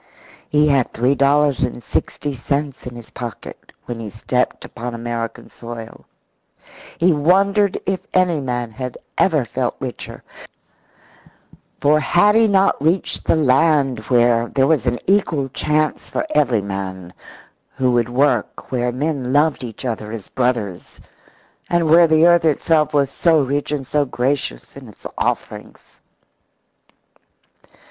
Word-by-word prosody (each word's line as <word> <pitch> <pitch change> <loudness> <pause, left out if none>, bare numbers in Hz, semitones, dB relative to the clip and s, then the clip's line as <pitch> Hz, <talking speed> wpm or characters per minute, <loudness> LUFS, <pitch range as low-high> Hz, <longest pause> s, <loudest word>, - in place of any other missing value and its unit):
He 150 0 +3
had 135 -4 +2
three 125 +4 +1
dollars 140 0 +2
and 120 -1 -2
sixty 145 +6 -3
cents 140 +1 -3
in 125 - -8
his 120 -2 -11
pocket 120 -2 -9
when 120 -2 -6
he 110 -2 -6
stepped 125 +4 -2
upon 120 +1 -6
American 115 0 -5
soil. 115 -1 -10 0.9
He 175 +1 +3
wondered 195 +6 +2
if 190 0 -1
any 180 -4 +2
man 120 -3 -3
had 125 +2 -6 0.2
ever - - +2
felt - - -2
richer. - - -7 1.6
For 150 +1 +4
had 175 +7 +3
he 225 0 +4
not 195 -6 +2
reached 165 +5 0
the - - +3
land 140 -3 +2
where 120 -1 +3
there 135 +1 +1
was 140 -4 +1
an 120 0 +1
equal 170 -8 +1
chance 150 +3 -1
for - - -2
every 125 -8 +2
man 95 -2 -6 0.6
who 130 -2 +1
would 120 -1 +1
work, 135 +4 0
where 125 -1 0
men 135 -1 -2
loved 145 0 +2
each 120 +1 -7
other 110 -3 -4
as 110 -3 -8
brothers, 120 -8 -2 0.7
and 170 -2 +1
where 165 +2 +6
the 160 +1 +4
earth 175 -1 +5
itself 155 0 +2
was 140 -2 +1
so 160 -4 +3
rich 140 +2 -2
and 145 -3 -2
so 145 +2 0
gracious 125 - -3
in - - -11
its - - -19
offerings? - - -5
135 Hz, 140 wpm, -19 LUFS, 120-155 Hz, 1.6 s, where